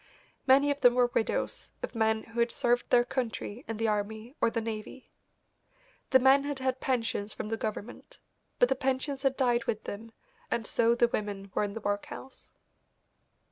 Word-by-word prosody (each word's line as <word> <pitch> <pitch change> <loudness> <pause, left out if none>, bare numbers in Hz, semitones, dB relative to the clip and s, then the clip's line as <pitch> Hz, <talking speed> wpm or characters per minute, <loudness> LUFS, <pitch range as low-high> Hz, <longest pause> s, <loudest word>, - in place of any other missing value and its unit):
Many 280 +2 +6
of 285 0 -3
them 245 -1 +6
were 245 -1 +3
widows 225 - -1
of - - -4
men 220 -1 +1
who 230 +1 -7
had 235 0 +3
served 240 0 +1
their 240 0 +5
country 245 -2 -3
in 225 - -4
the 225 +1 0
army 215 +3 -2
or - - +4
the 230 - -2
navy. 225 +3 -6 1.0
The 260 - +7
men 265 +2 +5
had 285 -1 -3
had 260 0 -1
pensions 230 -5 -1
from 210 - -5
the 225 - 0
government, 220 +1 -6 0.4
but 245 - +4
the 265 - +2
pensions 265 +1 -1
had 270 -1 +1
died 240 -3 +2
with 215 0 -2
them, 225 +3 -7 0.4
and 230 - -1
so 235 +2 +2
the 240 0 +3
women 200 -3 -4
were - - +1
in 205 -1 -3
the 225 - -5
workhouse. 205 +6 -5
235 Hz, 180 wpm, -29 LUFS, 220-260 Hz, 1.0 s, The